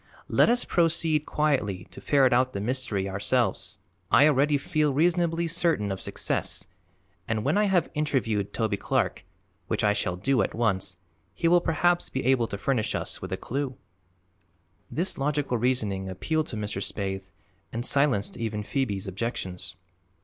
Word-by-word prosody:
Let - - +4
us 245 +1 +2
proceed 165 -3 +1
quietly 125 -12 0
to - - -9
ferret 135 -3 +4
out 130 +1 +2
the 100 - -3
mystery 105 -3 -1
ourselves. 95 +1 0 0.3
I 140 +5 +6
already 145 0 +3
feel 150 +1 0
reasonably 170 +1 +2
certain 165 - +1
of 95 - -4
success - - -1 0.6
and, 110 -1 -1
when 145 +6 +1
I 210 +1 +3
have 190 -4 +1
interviewed 120 -9 0
Toby 110 -3 -1
Clark, - - -1 0.4
which - - -1
I 105 -1 +4
shall 95 -3 -1
do 125 +7 +1
at - - -2
once, 95 -6 0 0.4
he 165 - +1
will 175 +1 +5
perhaps 175 +2 +2
be 130 - -3
able 130 -3 +3
to 100 - -5
furnish 115 +1 0
us - - -3
with 95 - -6
a 95 - -1
clew." 135 +3 -3 1.1
This 175 0 -2
logical 140 -3 0
reasoning 105 -6 0
appealed 155 - -1
to - - -5
Mr. 105 -2 -3
Spaythe 95 -1 -3 0.4
and 120 +2 -3
silenced 140 -9 +2
even 110 -2 -3
Phoebe's 105 -6 -2
objections. 95 -3 -4
125 Hz, 155 wpm, -27 LUFS, 100-150 Hz, 1.1 s, I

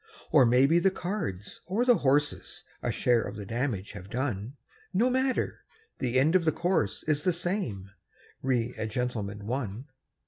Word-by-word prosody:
Or 135 -5 +6
maybe 135 +8 +5
the 195 - +4
cards 175 - -4
or 210 +7 +1
the 245 -3 +6
horses 145 -1 0 0.2
A - - 0
share 120 -2 +2
of - - -5
the 105 -1 -6
damage 115 -3 -2
have 100 -2 -10
done 125 0 -3 0.4
No 240 +6 +3
matter; 260 0 0 0.4
the 130 0 +1
end 155 +6 +3
of 185 - +4
the 160 - +3
course 170 - 0
is 150 -1 0
The 180 - +3
same: 170 - -3 0.5
"Re 125 -2 0
a 110 - -1
Gentleman, 105 -4 -3
One". 120 +1 -4
130 Hz, 165 wpm, -28 LUFS, 110-175 Hz, 0.5 s, Or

